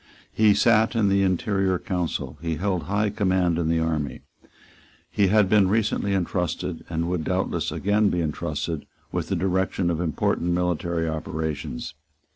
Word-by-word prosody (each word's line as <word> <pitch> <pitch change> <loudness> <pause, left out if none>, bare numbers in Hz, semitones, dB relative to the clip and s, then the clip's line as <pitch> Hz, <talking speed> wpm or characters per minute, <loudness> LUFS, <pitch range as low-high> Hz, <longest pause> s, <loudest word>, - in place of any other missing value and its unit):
He 105 -2 +4
sate 115 0 +3
in 105 -3 +3
the 100 0 +3
interior 95 0 +1
council; 90 -2 -3
he 80 -1 -2
held 90 -2 -1
high 105 +2 0
command 95 -5 +1
in 80 -2 0
the 85 - +2
army; 80 -5 -1 0.9
he 100 - +3
had 105 +1 +4
been 100 -1 +4
recently 100 -1 +1
entrusted, 90 -2 -2
and 85 0 -1
would 90 -2 -1
doubtless 90 +3 -1
again 105 +1 +2
be 90 - -1
entrusted, 80 0 -3 0.2
with - - -2
the - - -1
direction 95 -1 0
of 80 0 -2
important 85 +1 0
military 85 -1 0
operations. 80 -4 -4
90 Hz, 150 wpm, -24 LUFS, 80-100 Hz, 0.9 s, He